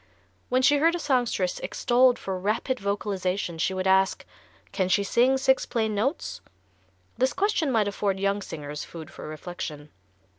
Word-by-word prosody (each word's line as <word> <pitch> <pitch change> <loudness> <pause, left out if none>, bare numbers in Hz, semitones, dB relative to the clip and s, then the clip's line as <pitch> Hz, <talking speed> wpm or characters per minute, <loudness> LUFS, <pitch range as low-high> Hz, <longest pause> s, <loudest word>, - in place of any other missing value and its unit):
When 255 +1 +2
she 290 +2 +5
heard 330 +4 +3
a - - -3
songstress 245 - 0
extolled 250 +1 +3
for 190 -1 -4
rapid 215 +6 -1
vocalization 195 -3 -2
she 190 +4 0
would 185 0 -2
ask: 190 0 +3 0.5
"Can 185 -2 0
she 200 +2 +3
sing 245 +6 +3
six 265 0 +2
plain 220 -2 0
notes?" 205 - -2 0.8
This 260 +1 +2
question 385 -8 +1
might 220 -4 +2
afford 200 -1 -1
young 200 +1 0
singers 150 -5 -6
food 160 -3 -10
for - - -9
reflection. 155 -2 -7
200 Hz, 155 wpm, -26 LUFS, 185-255 Hz, 0.8 s, she